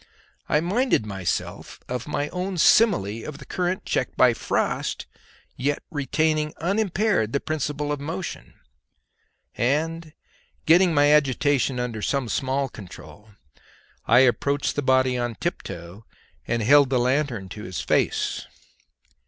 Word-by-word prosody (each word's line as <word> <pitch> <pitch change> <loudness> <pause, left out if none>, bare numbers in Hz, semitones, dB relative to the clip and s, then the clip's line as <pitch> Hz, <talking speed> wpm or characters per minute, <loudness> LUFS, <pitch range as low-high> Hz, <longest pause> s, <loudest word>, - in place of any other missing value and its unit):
I 150 - +3
minded 205 - +1
myself 95 -4 -4
of 125 +1 -4
my 145 -1 -2
own 185 +1 -4
simile 155 - +3
of 150 -2 -7
the 140 - -12
current 180 +4 -2
checked 130 - -2
by 125 -2 +5
frost, - - -2 0.5
yet 140 +3 -1
retaining 155 +1 0
unimpaired 195 - 0
the 140 - +1
principle 150 -1 -3
of 145 - -2
motion; 165 +5 -6 1.0
and 160 +5 -1 0.5
getting 170 +1 +5
my 145 +1 +5
agitation 140 -2 +2
under 120 -3 -3
some 135 +1 -1
small 135 +2 -1
control, 105 -1 -12 0.8
I 120 +3 +6
approached 140 +3 +1
the 145 - 0
body 130 -1 +2
on 120 -1 -2
tiptoe 85 +2 -6 0.4
and 115 -1 0
held 140 +3 +6
the 130 - +1
lanthorn 125 -5 0
to 105 +2 -8
its 90 -1 -5
face. - - 0
140 Hz, 130 wpm, -24 LUFS, 120-155 Hz, 1.0 s, I